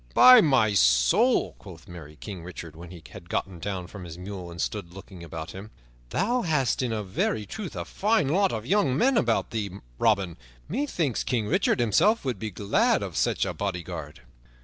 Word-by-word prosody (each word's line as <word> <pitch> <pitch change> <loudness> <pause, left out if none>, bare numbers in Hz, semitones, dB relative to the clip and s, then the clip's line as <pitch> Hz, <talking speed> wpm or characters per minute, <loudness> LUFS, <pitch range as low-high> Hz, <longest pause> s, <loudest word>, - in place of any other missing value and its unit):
"By 255 -2 +9
my 130 - +3
soul," - - +3
quoth - - -13
merry 80 -4 -11
King 95 +1 -8
Richard, 85 -2 -9
when 85 +1 -10
he 85 -3 -12
had 85 -3 -12
gotten 90 -2 -3
down 95 0 -4
from 95 +1 -10
his 85 -1 -9
mule 90 -1 -7
and 85 0 -10
stood 95 -4 -3
looking 95 -1 -11
about 80 0 -7
him, 95 +3 -9 0.4
"thou 240 - 0
hast 150 - +1
in 110 -4 -2
very 105 +3 -1
truth 210 - -7
a - - -4
fine 215 -6 +1
lot 190 +6 +2
of 110 0 -4
young 140 -5 +2
men 265 - +3
about 230 - +1
thee, 110 -3 -2 0.3
Robin. 100 -6 +1 0.3
Methinks 180 - -1
King 115 -4 -1
Richard 105 - +1
himself 140 - +3
would 125 -7 -2
be 110 - -4
glad 100 +1 +1
of - - -6
such - - +1
a - - -3
bodyguard." 85 -7 -5
100 Hz, 185 wpm, -26 LUFS, 85-135 Hz, 0.4 s, By